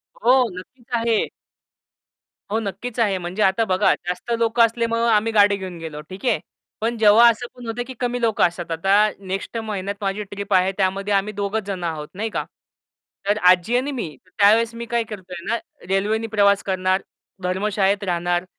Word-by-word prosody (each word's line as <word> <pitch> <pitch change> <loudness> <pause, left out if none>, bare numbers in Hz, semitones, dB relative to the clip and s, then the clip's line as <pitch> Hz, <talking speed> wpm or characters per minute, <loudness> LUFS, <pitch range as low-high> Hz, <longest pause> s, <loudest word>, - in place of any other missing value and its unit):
हो, 245 +3 +3 0.2
नक्कीच 235 +6 -12
आहे. 230 -2 +2 1.3
हो, 220 - +1
नक्कीच 220 +4 -5
आहे, 200 -4 +2
म्हणजे 180 +4 -4
आता 195 +4 +3
बघा 185 +1 +3
जास्त 180 +6 -5
लोकं 230 +1 +3
असल्यामुळे, 230 0 -1
आम्ही 215 +2 +2
गाडी 205 -1 +5
घेऊन 185 -3 -7
गेलो 155 -2 -7
ठीक 190 +6 -9
आहे. 245 - +2 0.4
पण 230 +1 -1
जेव्हा 220 +2 +7
असं 235 +1 -2
पण 245 -1 -11
होत 235 +2 -3
की 260 - -7
कमी 245 0 -1
लोकं 225 -2 +2
असतात. 170 -1 -7
आता 195 +6 +3
नेक्स्ट 195 +4 -5
महिन्यात 200 -3 -3
माझी 200 +1 -2
ट्रिप 200 0 -5
आहे, 185 +1 +4
त्यामध्ये 195 +1 0
आम्ही 200 +2 +1
दोघेच 200 +2 -2
जण 190 -3 -5
आहोत, 155 -3 -3
नाही 220 +4 -3
का. - - -2 0.8
तर 205 +1 +2
आजी 185 +6 +3
आणि 275 +3 -1
मी 175 - -5
त्यावेळेस 215 +5 +3
मी 235 0 -5
काय 235 -1 +2
करतोय 185 -5 -9
ना 230 - +1 0.3
रेल्वेने 210 +4 0
प्रवास 200 -2 +3
करणार, 185 0 0 0.4
धर्मशाळेत 200 +2 0
राहणार. 175 -1 0
205 Hz, 175 wpm, -22 LUFS, 185-225 Hz, 1.3 s, जेव्हा